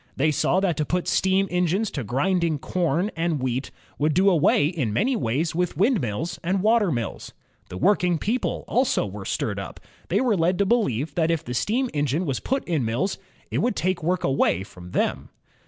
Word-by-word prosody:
They 155 +3 +2
saw 175 +5 +2
that 185 -4 0
to 150 - +1
put 180 +4 -1
steam 190 +1 +2
engines 180 +4 +1
to 135 - -4
grinding 155 - 0
corn 175 +6 -1
and 165 -2 0
wheat 130 +1 -2 0.3
would 150 +1 +1
do 195 +2 +5
away 150 -3 +3
in 150 - -1
many 240 - +1
places 155 - -1
with 175 -2 -1
windmills 175 - 0
and 185 +2 0
water 215 -4 +3
mills. 120 -6 -4 0.4
The 90 - -6
working 180 - +2
people 225 +10 -2
also - - +1
were - - -7
stirred - - -2
up. - - -7 0.3
They - - +2
were 245 -5 +2
led 175 +1 +1
to 200 - +2
beheve 160 - 0
that 165 0 +1
if 165 -2 0
the 125 - -5
steam 235 - 0
engine 145 +4 0
was 135 -5 -1
put 270 +1 -1
in 160 -7 0
mills, 120 - -1 0.3
it - - 0
would 240 -2 +1
take 185 -1 -1
work 175 +2 0
away 135 -8 +1
from 90 -2 -12
them. - - -1
170 Hz, 195 wpm, -24 LUFS, 140-190 Hz, 0.4 s, do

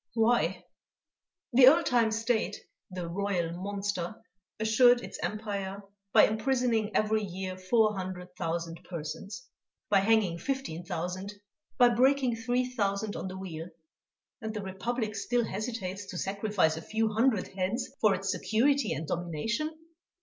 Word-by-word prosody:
"Why! 230 +1 +2 0.9
the 250 +1 +8
old 325 +5 +7
time 235 -3 +3
state, 225 +1 0 0.3
the 180 -2 -5
Royal 180 -2 -1
monster, 195 -1 -3 0.4
assured 240 +3 +5
its - - -7
empire 200 -2 -3 0.3
by - - +7
imprisoning 225 -1 0
every 215 0 +2
year 190 -1 -4
four 210 +3 +2
hundred 185 -1 -6
thousand 165 -1 -3
persons, 190 +8 -6 0.5
by 200 - +6
hanging 195 -4 +2
fifteen 265 -8 -3
thousand, 180 +4 -4 0.4
by 245 -2 +7
breaking 255 +1 +3
three 245 +2 0
thousand 205 -3 -1
on - - -4
the 185 0 -6
wheel 170 -3 -6 0.7
and 220 -1 -4
the 210 - -3
Republic 215 +4 -3
still 235 +3 0
hesitates 200 -2 -4
to 180 - -6
sacrifice 195 -4 +1
a - - -5
few 220 +3 -1
hundred 225 -3 +2
heads 195 +7 -2
for 210 -3 +5
its 195 +1 -2
security 275 +9 +2
and 155 +4 -4
domination! 175 - -2
205 Hz, 135 wpm, -29 LUFS, 185-230 Hz, 0.9 s, the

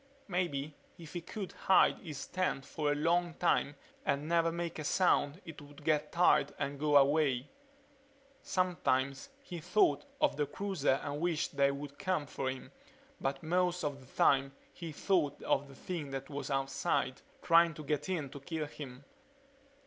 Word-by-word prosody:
Maybe 155 -6 -1 0.2
if 165 -3 -11
he 175 - -3
could 195 +2 -6
hide 190 - +4
in - - -17
his 150 -4 -5
tent 180 -7 -1
for 150 -2 -1
a - - +1
long 170 +2 +1
time 145 - +1 0.3
and 140 +2 0
never 165 0 +3
make 170 -1 -4
a - - -3
sound 150 -2 +2
it 160 -3 -9
would 145 +1 -14
get 150 -1 +1
tired 175 +1 +4
and 140 -1 -3
go 150 -1 +5
away... 140 -2 +3 0.9
Sometimes 140 - 0
he 175 -9 -6
thought 155 -3 +2
of - - +2
the 145 -1 +1
cruiser 150 -6 0
and 145 0 -4
wished 170 -4 0
they 140 0 +4
would 140 0 -6
come 185 -6 0
for 135 -1 -3
him 130 0 -7 0.5
but 135 +2 -2
most 180 +2 +1
of 145 -2 -2
the 130 - -16
time 135 0 +4 0.2
he 170 -2 -7
thought 150 -3 +1
of 140 +1 +1
the 135 - -13
thing 160 -1 -5
that 135 +1 -6
was 145 +1 -4
outside, 135 -1 0 0.2
trying 165 -1 +5
to 155 - -8
get 150 +2 -2
in 155 -8 -2
to 140 - -8
kill 155 +2 -3
him. 140 -2 -9
150 Hz, 170 wpm, -33 LUFS, 140-170 Hz, 0.9 s, go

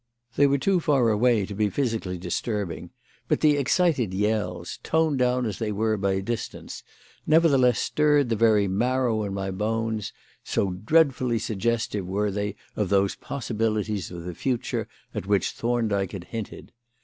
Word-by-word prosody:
They 145 - +5
were 140 0 +2
too 180 +7 +2
far 140 -7 +2
away 110 -1 +3
to 100 - -7
be 105 +1 +1
physically 110 -7 -2
disturbing, 90 +1 -3 0.4
but - - +1
the 150 -1 +5
excited 140 - +1
yells, 95 -4 -1
toned 160 -3 +1
down 125 0 +2
as 105 -4 -4
they 110 -2 -1
were 110 +1 0
by 95 -1 0
distance, 115 +2 -5 0.5
nevertheless 140 -7 +4
stirred 150 -3 +2
the 115 - +1
very 105 -2 +4
marrow 120 +3 +1
in 100 -1 -4
my 95 0 -3
bones, 110 +1 -2 0.3
so 95 - 0
dreadfully 125 - +2
suggestive 110 -2 -1
were 100 +2 0
they 105 +1 -3 0.2
of 105 -4 -1
those 100 -1 +2
possibilities 110 -6 -2
of 85 -1 -8
the 90 +1 -5
future 125 +6 -2 0.3
at 95 - -5
which 100 -1 +2
Thorndyke 110 -5 -1
had 95 -3 -6
hinted. 110 +3 -7
110 Hz, 155 wpm, -25 LUFS, 100-125 Hz, 0.5 s, They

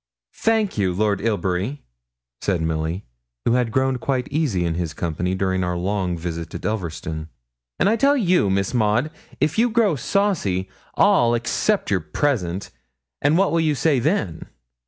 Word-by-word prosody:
'Thank 220 - +1
you, 95 -2 +2
Lord 105 -1 +1
Ilbury,' 105 +4 -1 0.6
said 95 -4 0
Milly, 80 +3 -2 0.4
who - - +3
had 125 -2 +1
grown 130 +1 +1
quite 130 -1 -1
easy 135 - 0
in 85 - 0
his 85 -2 -3
company 90 +2 -2
during 95 -1 0
our 90 -1 -1
long 90 -1 -1
visit 85 0 -5
at - - -6
Elverston; 80 -6 -3 0.5
'and - - +2
I 215 - +4
tell 280 +5 +4
you, 180 - +3
Miss 95 +3 0
Maud, 120 +5 +2 0.3
if 150 +8 +1
you 240 +1 +4
grow 220 -7 +3
saucy, 140 - 0 0.3
I'll 120 0 +4
accept 195 - 0
your 95 - +3
present, 90 - -1 0.5
and 145 +3 +3
what 195 +1 +3
will 165 - +2
you 155 -2 +2
say 140 0 +2
then?' 115 - -1
105 Hz, 160 wpm, -22 LUFS, 90-150 Hz, 0.6 s, I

